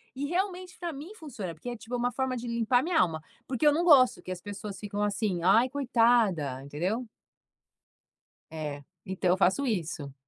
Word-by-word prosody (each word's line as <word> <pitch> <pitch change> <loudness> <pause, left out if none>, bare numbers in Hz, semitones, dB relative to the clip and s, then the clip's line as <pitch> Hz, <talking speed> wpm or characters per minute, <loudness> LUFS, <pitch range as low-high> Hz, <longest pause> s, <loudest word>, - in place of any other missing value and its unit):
E 275 +2 -3
realmente 365 +2 -2
pra 345 -2 -4
mim 300 +8 -9
funciona, 235 - -6
porque 205 +10 -7
é 240 - -5
tipo 230 +3 -6
uma 245 0 0
forma 260 -1 -1
de 240 - -6
limpar 235 +1 +2
a - - -2
minha 330 0 +1
alma, 160 -2 +1 0.3
porque 260 +3 -1
eu 295 - +6
não 330 +4 +1
gosto 270 -7 +6
que 185 - -6
as 180 -1 -5
pessoas 205 -1 -7
ficam 205 0 -3
assim, 205 -3 -1
ai, 225 +8 +5
coitada, 230 - +2
entendeu. 180 - -2 1.5
É, 150 -2 -5 0.2
então 185 -1 -1
eu 185 - +3
faço 195 +9 +2
isso. 165 - -3
230 Hz, 185 wpm, -28 LUFS, 185-270 Hz, 1.5 s, eu